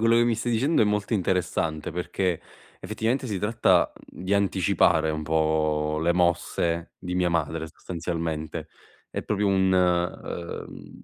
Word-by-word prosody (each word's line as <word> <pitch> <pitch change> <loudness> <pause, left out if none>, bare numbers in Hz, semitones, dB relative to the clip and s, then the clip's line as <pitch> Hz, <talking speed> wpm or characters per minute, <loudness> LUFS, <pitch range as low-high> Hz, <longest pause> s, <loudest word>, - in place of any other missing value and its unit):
quello 115 +1 +4
che 120 - +5
mi 120 - +2
stai 115 +2 -2
dicendo 130 +5 +3
è - - +5
molto 105 +1 -1
interessante 85 -5 -1
perché 90 0 -1 0.4
effettivamente 125 +4 -1
si 100 -3 -2
tratta, 105 +4 +3 0.2
mhmm, - - -10
di 100 - +1
anticipare 95 -5 +3
un 75 0 -3
po' 75 -1 +1
le 85 +2 +3
mosse 85 -1 0
di 90 -1 -5
mia 90 -1 +2
madre 80 0 -1
sostanzialmente, 80 -3 -4 0.4
è - - -4
proprio 105 0 0
un, 95 -1 +3
uhm, 90 -1 -1
mhmm, - - -12
90 Hz, 150 wpm, -26 LUFS, 80-100 Hz, 0.4 s, che